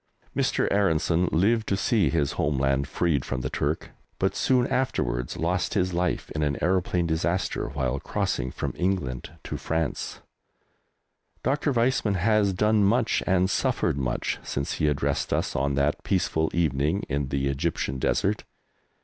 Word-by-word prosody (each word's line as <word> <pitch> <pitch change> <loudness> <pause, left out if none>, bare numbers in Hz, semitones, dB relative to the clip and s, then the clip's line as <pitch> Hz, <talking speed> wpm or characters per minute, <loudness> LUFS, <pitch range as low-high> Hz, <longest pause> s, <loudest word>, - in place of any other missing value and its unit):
Mr. - - +1
Aaronson 90 -3 +2
lived 110 +7 +2
to 100 - +1
see 105 +1 +2
his 75 -4 +1
home 70 -1 0
land 70 +1 +1
freed 75 -3 0
from 65 -2 -3
the - - -3
Turk, 75 +3 -2 0.3
but - - 0
soon 125 -2 +3
afterwards 60 - -1
lost 90 +4 0
his 90 -2 +1
life 90 +1 -1
in 75 - -3
an 75 -2 0
aeroplane 90 -1 +1
disaster 85 -2 -1
while 70 -1 -1
crossing 65 - -1
from - - -4
England 90 -10 -1
to - - -4
France. 80 -2 -2 1.2
Dr. 145 +2 +1
Weizmann 120 -4 +1
has 105 +2 +3
done 105 +2 +3
much 115 +4 +2
and 90 0 +3
suffered 80 -5 0
much 65 -2 -1
since 70 0 -3
he 75 - +2
addressed 70 -1 0
us - - 0
on 70 0 +1
that 70 +2 0
peaceful 80 -4 +1
evening 80 +2 +1
in 70 -1 -1
the 70 0 -1
Egyptian 70 -2 -1
desert. 100 +9 +1
85 Hz, 150 wpm, -26 LUFS, 70-95 Hz, 1.2 s, soon